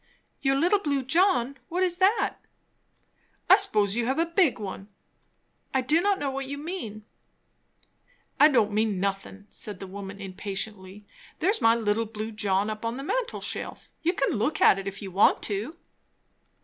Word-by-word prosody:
'" -, -, -45 dB
"Your 270 Hz, -1 st, +2 dB
'little 355 Hz, +9 st, +3 dB
blue 280 Hz, -6 st, -1 dB
John'? 275 Hz, -5 st, +2 dB
What 360 Hz, +2 st, 0 dB
is 355 Hz, -1 st, 0 dB
that?" 385 Hz, +5 st, +2 dB, 1.1 s
"I -, -, +9 dB
s'pose 205 Hz, -1 st, +2 dB
you 235 Hz, 0 st, 0 dB
have 265 Hz, -, 0 dB
a 330 Hz, -, +2 dB
big 335 Hz, -4 st, +2 dB
one." 195 Hz, -2 st, -7 dB, 0.9 s
"I 265 Hz, -, +3 dB
do 300 Hz, +6 st, +2 dB
not 400 Hz, +1 st, +2 dB
know 280 Hz, -2 st, -2 dB
what 270 Hz, 0 st, -4 dB
you 285 Hz, +1 st, -5 dB
mean." 285 Hz, -, -6 dB, 1.3 s
"I 300 Hz, -, +9 dB
don't 225 Hz, -8 st, +2 dB
mean 210 Hz, -2 st, 0 dB
nothin'," 195 Hz, +1 st, -3 dB
said 205 Hz, -4 st, -5 dB
the 195 Hz, -, -6 dB
woman 195 Hz, +1 st, -8 dB
impatiently. 195 Hz, +1 st, -6 dB, 0.3 s
"There's 400 Hz, +6 st, +1 dB
my 225 Hz, 0 st, +5 dB
'little 225 Hz, 0 st, 0 dB
blue 215 Hz, 0 st, -6 dB
John' 205 Hz, -1 st, 0 dB
up 215 Hz, +1 st, -7 dB
on 230 Hz, +2 st, -2 dB
the 275 Hz, -, -6 dB
mantel 485 Hz, -, -2 dB
shelf; -, -, -4 dB
you 340 Hz, +2 st, +1 dB
can 275 Hz, -, 0 dB
look 305 Hz, +8 st, 0 dB
at 195 Hz, -, +6 dB
it 195 Hz, -, -6 dB
if 200 Hz, +1 st, -6 dB
you 190 Hz, -, -6 dB
want 195 Hz, +3 st, +3 dB
to." 220 Hz, -, -4 dB
230 Hz, 175 wpm, -26 LUFS, 205-310 Hz, 1.3 s, I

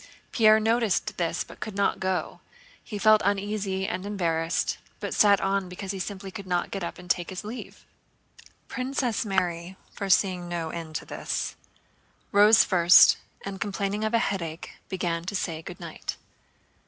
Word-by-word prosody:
Pierre 215 Hz, -2 st, +6 dB
noticed 220 Hz, -2 st, +1 dB
this 170 Hz, -1 st, -1 dB
but -, -, -14 dB
could 215 Hz, -, -6 dB
not 200 Hz, 0 st, +1 dB
go. 185 Hz, -1 st, -2 dB, 0.4 s
He 210 Hz, -, -6 dB
felt 215 Hz, +1 st, +5 dB
uneasy 200 Hz, -1 st, -1 dB
and 185 Hz, -, -3 dB
embarrassed, 170 Hz, -5 st, -1 dB, 0.2 s
but -, -, -4 dB
sat 200 Hz, -2 st, +5 dB
on 195 Hz, -1 st, 0 dB
because 190 Hz, +2 st, -5 dB
he 195 Hz, -, -5 dB
simply 195 Hz, +1 st, -5 dB
could 195 Hz, 0 st, -8 dB
not 175 Hz, -1 st, -1 dB
get 195 Hz, -2 st, -4 dB
up 170 Hz, -, -5 dB
and 180 Hz, -, -12 dB
take 175 Hz, 0 st, 0 dB
his 185 Hz, +1 st, -6 dB
leave. 225 Hz, +4 st, -8 dB, 0.8 s
Princess 255 Hz, -2 st, -1 dB
Mary, 180 Hz, -1 st, -1 dB, 0.2 s
foreseeing 185 Hz, -2 st, +1 dB
no 165 Hz, -2 st, -3 dB
end 165 Hz, -2 st, -7 dB
to -, -, -3 dB
this, -, -, -3 dB, 0.8 s
rose 210 Hz, +2 st, +7 dB
first, 175 Hz, -1 st, +7 dB, 0.3 s
and 195 Hz, -1 st, -6 dB
complaining 205 Hz, 0 st, -2 dB
of 220 Hz, +2 st, +1 dB
a -, -, +6 dB
headache 170 Hz, -7 st, -3 dB, 0.2 s
began 170 Hz, -3 st, -2 dB
to 185 Hz, +3 st, -4 dB
say 165 Hz, -4 st, -2 dB
good -, -, -9 dB
night. -, -, -6 dB
195 Hz, 160 wpm, -26 LUFS, 175-205 Hz, 0.8 s, rose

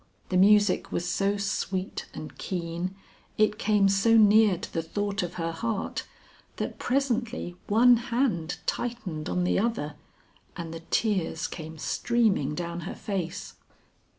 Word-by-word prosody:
The 185 Hz, -, -1 dB
music 205 Hz, 0 st, +4 dB
was 175 Hz, -, -2 dB
so 195 Hz, +3 st, +1 dB
sweet 195 Hz, -1 st, -2 dB
and 155 Hz, -, -8 dB
keen, 175 Hz, +1 st, -3 dB, 0.4 s
it 215 Hz, -1 st, +2 dB
came 205 Hz, -2 st, +3 dB
so 195 Hz, +4 st, +4 dB
near 210 Hz, -2 st, +6 dB
to -, -, -8 dB
the 165 Hz, -, 0 dB
thought 200 Hz, +4 st, -2 dB
of 175 Hz, -1 st, -4 dB
her 165 Hz, -1 st, -2 dB
heart, 220 Hz, +5 st, -3 dB, 0.5 s
that -, -, -4 dB
presently 245 Hz, -7 st, -1 dB
one 240 Hz, +3 st, +6 dB
hand 230 Hz, -9 st, -1 dB
tightened 220 Hz, -11 st, -3 dB
on 180 Hz, -, 0 dB
the 180 Hz, -, +2 dB
other, 205 Hz, -9 st, -1 dB, 0.6 s
and 165 Hz, -2 st, -5 dB
the 165 Hz, -, -6 dB
tears 190 Hz, -7 st, 0 dB
came 160 Hz, -1 st, -7 dB
streaming 200 Hz, -, +1 dB
down 170 Hz, 0 st, -4 dB
her -, -, -6 dB
face. 195 Hz, -3 st, -4 dB
195 Hz, 140 wpm, -27 LUFS, 170-220 Hz, 0.6 s, near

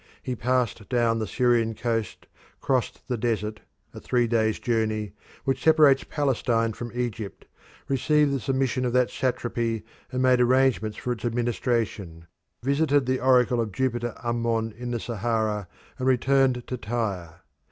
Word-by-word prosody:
He 125 Hz, -, -3 dB
passed 125 Hz, -3 st, -1 dB
down 115 Hz, -2 st, +2 dB
the 110 Hz, -, -2 dB
Syrian 120 Hz, -2 st, +2 dB
coast, 115 Hz, -1 st, -2 dB, 0.3 s
crossed 130 Hz, -3 st, -1 dB
the 125 Hz, -3 st, -2 dB
desert 105 Hz, -2 st, -1 dB, 0.3 s
a -, -, -8 dB
three 120 Hz, -1 st, +1 dB
days' 110 Hz, -2 st, +1 dB
journey 110 Hz, -3 st, -1 dB, 0.3 s
which 135 Hz, -1 st, -1 dB
separates 150 Hz, -4 st, +5 dB
Palestine 120 Hz, -5 st, 0 dB
from 120 Hz, +1 st, -7 dB
Egypt, 120 Hz, -4 st, -4 dB, 0.4 s
received 145 Hz, +2 st, +2 dB
the 135 Hz, -, 0 dB
submission 130 Hz, +2 st, 0 dB
of 125 Hz, -1 st, -1 dB
that 125 Hz, -1 st, +3 dB
satrapy 120 Hz, -3 st, -1 dB, 0.3 s
and 130 Hz, -, -2 dB
made 130 Hz, -1 st, +4 dB
arrangements 125 Hz, -4 st, +2 dB
for 125 Hz, -, -3 dB
its 115 Hz, -3 st, -4 dB
administration, 115 Hz, -7 st, -1 dB, 0.4 s
visited 140 Hz, 0 st, +2 dB
the 130 Hz, +1 st, 0 dB
oracle 125 Hz, -2 st, +3 dB
of 110 Hz, -2 st, -3 dB
Jupiter 120 Hz, +1 st, -1 dB
Ammon 115 Hz, -2 st, -1 dB
in 120 Hz, +1 st, -6 dB
The 120 Hz, -1 st, -2 dB
Sahara, 110 Hz, -3 st, -1 dB, 0.3 s
and 130 Hz, -, -1 dB
returned 130 Hz, -1 st, +2 dB
to 125 Hz, -, -4 dB
Tyre. 100 Hz, -7 st, -4 dB
120 Hz, 145 wpm, -26 LUFS, 110-130 Hz, 0.4 s, separates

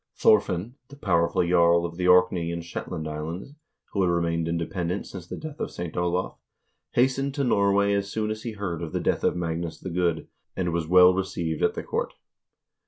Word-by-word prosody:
Thorfinn, 105 Hz, +3 st, +2 dB
the 140 Hz, -, -13 dB
powerful 90 Hz, -6 st, +1 dB
jarl 85 Hz, -1 st, +4 dB
of 85 Hz, -1 st, -5 dB
the 90 Hz, +1 st, -1 dB
Orkney 90 Hz, -2 st, +4 dB
and 85 Hz, 0 st, -5 dB
Shetland 85 Hz, -1 st, -5 dB
Islands, 80 Hz, -, -5 dB, 0.4 s
who 100 Hz, -, 0 dB
had 90 Hz, -, +3 dB
remained 85 Hz, -1 st, 0 dB
independent 85 Hz, +2 st, -2 dB
since 90 Hz, -3 st, -9 dB
the -, -, -6 dB
death 155 Hz, -1 st, -8 dB
of -, -, -2 dB
St. 85 Hz, -2 st, -6 dB
Olav, 90 Hz, +1 st, -1 dB, 0.5 s
hastened 135 Hz, +2 st, +1 dB
to 140 Hz, -, 0 dB
Norway 100 Hz, -3 st, +3 dB
as 100 Hz, 0 st, -1 dB
soon 110 Hz, -1 st, -1 dB
as 110 Hz, 0 st, -5 dB
he 115 Hz, -1 st, -5 dB
heard 95 Hz, -5 st, -4 dB
of 80 Hz, -2 st, -5 dB
the -, -, 0 dB
death -, -, 0 dB
of -, -, +2 dB
Magnus 85 Hz, -1 st, -3 dB
the 95 Hz, -, -6 dB
Good, 85 Hz, -2 st, 0 dB, 0.3 s
and 90 Hz, -2 st, -1 dB
was 85 Hz, -2 st, -1 dB
well 90 Hz, +1 st, +7 dB
received 85 Hz, -4 st, -2 dB
at -, -, +2 dB
the -, -, -4 dB
court. -, -, -3 dB
90 Hz, 195 wpm, -26 LUFS, 85-100 Hz, 0.5 s, well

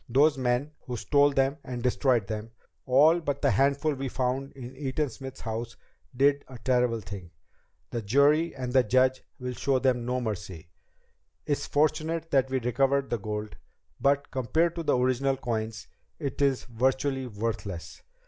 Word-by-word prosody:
Those 145 Hz, +5 st, +4 dB
men 130 Hz, +2 st, 0 dB, 0.2 s
who 125 Hz, -1 st, -3 dB
stole 145 Hz, +4 st, +3 dB
them 135 Hz, +2 st, +1 dB
and 125 Hz, -2 st, -5 dB
destroyed 125 Hz, -3 st, +2 dB
them, 110 Hz, +2 st, -5 dB, 0.4 s
all 150 Hz, +7 st, +6 dB
but 145 Hz, -4 st, -3 dB
the -, -, +4 dB
handful 140 Hz, +7 st, +2 dB
we 135 Hz, -1 st, -4 dB
found 130 Hz, +2 st, -1 dB
in 130 Hz, -1 st, -9 dB
Eaton 140 Hz, +1 st, -2 dB
Smith's 135 Hz, +2 st, -9 dB
house, 115 Hz, +1 st, -4 dB, 0.4 s
did 140 Hz, +1 st, +3 dB
a 130 Hz, -, -10 dB
terrible 125 Hz, -1 st, +1 dB
thing. 95 Hz, -3 st, -8 dB, 0.6 s
The 120 Hz, -, -2 dB
jury 140 Hz, +9 st, +3 dB
and 125 Hz, -2 st, -4 dB
the 130 Hz, -, +6 dB
judge 130 Hz, +3 st, +2 dB, 0.2 s
will 125 Hz, -2 st, -4 dB
show 135 Hz, +2 st, +1 dB
them 125 Hz, -2 st, +1 dB
no 125 Hz, +1 st, -1 dB
mercy. 100 Hz, -8 st, -5 dB, 0.8 s
It's 145 Hz, -, -1 dB
fortunate 155 Hz, +2 st, 0 dB
that 135 Hz, -2 st, +3 dB
we 130 Hz, 0 st, 0 dB
recovered 135 Hz, +3 st, +1 dB
the 120 Hz, -, 0 dB
gold, 105 Hz, +1 st, -5 dB, 0.4 s
but 140 Hz, +1 st, +1 dB
compared 160 Hz, +6 st, +1 dB
to -, -, -1 dB
the 155 Hz, -, +2 dB
original 130 Hz, +2 st, +1 dB
coins, 115 Hz, -3 st, -3 dB, 0.3 s
it 145 Hz, -2 st, -4 dB
is 135 Hz, -2 st, +2 dB
virtually 130 Hz, +2 st, 0 dB
worthless. 100 Hz, -, -5 dB
130 Hz, 160 wpm, -28 LUFS, 120-140 Hz, 0.8 s, all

